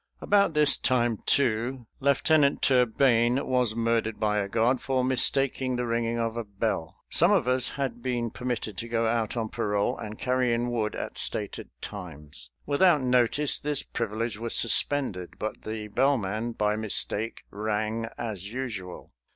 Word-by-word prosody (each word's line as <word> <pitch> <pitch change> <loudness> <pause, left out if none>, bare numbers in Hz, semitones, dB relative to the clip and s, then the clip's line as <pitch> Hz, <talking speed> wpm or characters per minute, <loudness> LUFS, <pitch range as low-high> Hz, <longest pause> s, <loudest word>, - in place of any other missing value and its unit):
About 200 -5 +2
this 150 -2 +5
time, 120 -4 +1
too, 120 -1 +1
Lieutenant 140 +1 +2
Turbayne 125 0 +3
was 125 -4 +1
murdered 115 -1 0
by 105 -1 +1
a 100 -1 -2
guard 120 +5 +1
for 130 -1 0
mistaking 130 0 +1
the 125 0 -2
ringing 115 0 -1
of 115 -1 -2
a 120 - -3
bell. 100 -5 -3
Some 170 +5 +4
of 185 -11 +2
us 130 0 +4
had 130 -4 -3
been 120 -2 -2
permitted 120 -5 -4
to 115 - -5
go 115 0 0
out 115 0 -1
on 110 -2 -2
parole 105 -1 -1
and 105 0 -8
carry 125 -2 +1
in 120 +1 -2
wood 110 -3 -1
at - - -4
stated - - -1
times. 75 -10 -8 0.2
Without 150 +1 +3
notice, 125 +3 +2
this 145 -1 -2
privilege 115 -1 -3
was 115 0 0
suspended, 115 -6 +1
but 110 0 -5
the 110 -1 -5
bellman, 115 -2 0
by 105 -1 0
mistake, 110 +1 -1
rang 110 +2 -2
as 100 -3 -5
usual. 110 - -6
115 Hz, 155 wpm, -27 LUFS, 110-130 Hz, 0.2 s, this